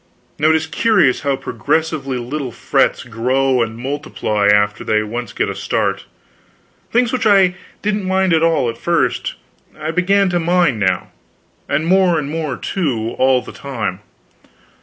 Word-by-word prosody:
Now 155 +2 +4
it 160 - +4
is 160 0 0
curious 165 - +2
how 140 -1 0
progressively 150 -2 -2
little 130 +2 -4
frets - - +1
grow 130 +2 +1
and 115 -1 -2
multiply 120 -6 -2
after 105 0 +3
they 105 0 +1
once 115 +1 -5
get - - -1
a - - -3
start. - - -1 0.9
Things 245 0 +2
which 255 -3 +1
I 195 -3 +5 0.3
didn't 205 -1 -1
mind 190 -1 +2
at 160 - +3
all, 165 -6 +2
at 115 0 -4
first, 170 -1 0 0.4
I 155 +1 -2
began 195 +3 +2
to 175 - +1
mind 170 -7 +2
now 95 -3 0 0.6
and 145 +3 0
more 185 -1 +3
and 145 -1 -3
more, 155 -5 -3
too, 120 - -2
all 130 -1 +3
the - - -9
time. 115 -9 -4
145 Hz, 160 wpm, -18 LUFS, 120-175 Hz, 0.9 s, I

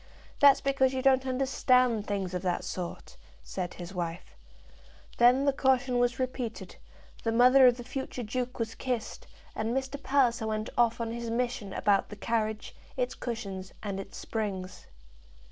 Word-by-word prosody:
"That's 280 -1 +7
because 270 -1 +2
you 260 - -2
don't 265 -1 +4
understand 255 -3 +2
things 195 -3 -2
of 180 - -2
that 180 -1 -1
sort," 185 - -6 0.3
said 180 -2 -5
his 175 +1 -8
wife. 170 -2 -5 0.8
Then 250 +3 +5
the 280 - +3
caution 260 -2 +2
was 245 0 +1
repeated, 255 -3 -4 0.5
the 225 - 0
mother 250 +3 +7
of 245 -1 +4
the 245 - -7
future 255 0 -5
duke 250 +3 -3
was 230 -1 -3
kissed, 245 -3 -4 0.3
and 225 +4 -1
Mr. 270 +1 -4
Palliser 245 -5 +2
went 215 0 -3
off 235 -1 +2
on 230 -1 -2
his 235 0 -4
mission 235 -3 -2
about 200 0 +1
the 210 - -8
carriage, 220 0 -2 0.2
its 250 -1 -1
cushions, 195 -6 -6
and 200 -2 -3
its 195 - -8
springs. 195 -4 -4
235 Hz, 160 wpm, -29 LUFS, 210-255 Hz, 0.8 s, That's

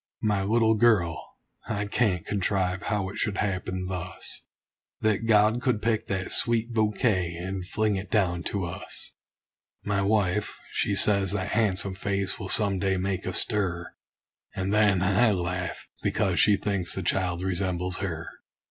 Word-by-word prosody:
My 105 -2 +2
little 110 +3 +3
girl 105 -8 +2 0.3
I 105 -3 -2
can't 100 -5 0
contrive 95 -1 0
how 100 -2 -1
it 100 - -7
should 105 -4 -1
happen 95 -2 -2
thus 90 -1 -5 0.6
That 110 +1 +1
God 110 +2 +4
could 125 -5 +1
pick 110 0 0
that 95 -1 -2
sweet 115 0 +2
bouquet, 105 -5 +1
and 90 +1 -5
fling 105 0 0
it 95 - -6
down 90 -5 +1
to 100 -3 -2
us! 85 - -6 0.7
My 100 -1 0
wife, 100 -1 0
she 100 - 0
says 100 -2 +3
that 95 -1 -2
han'some 100 -3 +1
face 100 +1 -2
will 95 -3 -5
some 100 -4 +3
day 95 -1 +1
make 95 0 -2
a 95 - -2
stir; 90 -5 +1 0.6
And 95 +1 -1
then 105 -4 +4
I 105 +4 +3
laugh, 90 -1 -3
because - - 0
she 105 - +5
thinks 100 -3 -1
the 95 - -3
child 90 0 0
resembles 90 -1 -1
her. 85 -5 -4
100 Hz, 155 wpm, -27 LUFS, 95-105 Hz, 0.7 s, she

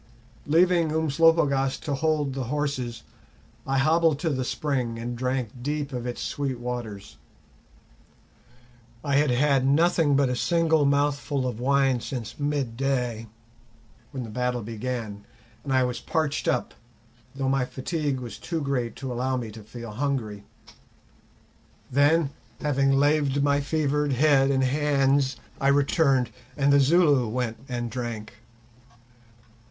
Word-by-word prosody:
Leaving 170 +1 +3
Umslopogaas 155 -3 +2
to 145 - -3
hold 150 -1 0
the 135 -1 -3
horses, 130 -4 -3 0.6
I 135 0 +1
hobbled 160 +2 +3
to 165 - 0
the 130 -2 -1
spring 125 -4 -2
and 120 +1 -4
drank 125 -1 -1
deep 145 +1 -3
of 125 -1 -4
its 120 - -4
sweet 135 -3 -3
waters. 120 -5 -6 1.9
I 140 -1 +1
had 150 0 +3
had 135 +1 +3
nothing 155 +1 +3
but 140 -1 +3
a 125 - -1
single 160 +5 +2
mouthful 140 -1 0
of 125 -3 -3
wine 135 0 +2
since 115 -1 -6
midday, 130 -4 -1 0.8
when 130 -3 -5
the 110 - -8
battle 125 0 -1
began, 110 -2 -5 0.4
and 140 - -4
I 130 -1 +3
was 125 -1 -2
parched 155 -3 -1
up, 125 - 0 0.6
though 135 -1 -2
my 135 0 +2
fatigue 140 +1 -3
was 120 -2 -8
too 165 -2 -3
great 130 -6 -2
to 130 -2 -5
allow 130 +2 -1
me 115 -3 -5
to 110 +1 -11
feel 115 +1 -9
hungry. 110 -5 -3 1.5
Then, 145 +2 +3 0.3
having 135 -2 +1
laved 145 0 +2
my 145 0 +3
fevered 150 -1 0
head 135 0 +4
and 135 -1 +2
hands, 135 0 +2 0.2
I 135 - +1
returned, 140 -3 +3 0.3
and 140 0 +3
the 140 - +6
Zulu 145 -3 +4
went 115 0 -2
and 120 -2 -3
drank. 115 -4 -5
135 Hz, 135 wpm, -25 LUFS, 125-145 Hz, 1.9 s, the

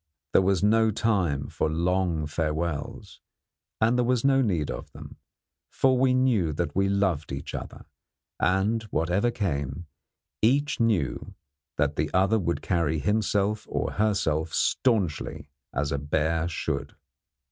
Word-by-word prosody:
There - - +6
was 95 0 +1
no 110 +1 +4
time 95 -10 0
for 80 - -1
long 85 0 0
farewells; 75 0 -3 0.6
and 115 +3 +3
there - - +3
was 125 0 +1
no 135 -1 +4
need 90 - 0
of - - -7
them, - - -11 0.5
for 130 -1 +2
we 130 0 +3
knew 115 -11 +2
that 85 +3 -3
we 95 +1 +2
loved 95 -7 0
each 70 +1 -6
other, - - -7 0.5
and, 95 +6 +1
whatever 90 +8 +1
came, 85 - -3 0.6
each 140 +7 +2
knew 105 - 0 0.4
that 75 0 0
the 75 0 0
other 100 +4 +3
would 85 -5 -2
carry 85 -4 0
himself 105 +4 0
or - - -2
herself 85 -7 0
staunchly 95 - 0 0.2
as 70 +1 -2
a 70 - -1
bear 80 +3 0
should. 85 - -3
95 Hz, 135 wpm, -26 LUFS, 80-110 Hz, 0.6 s, There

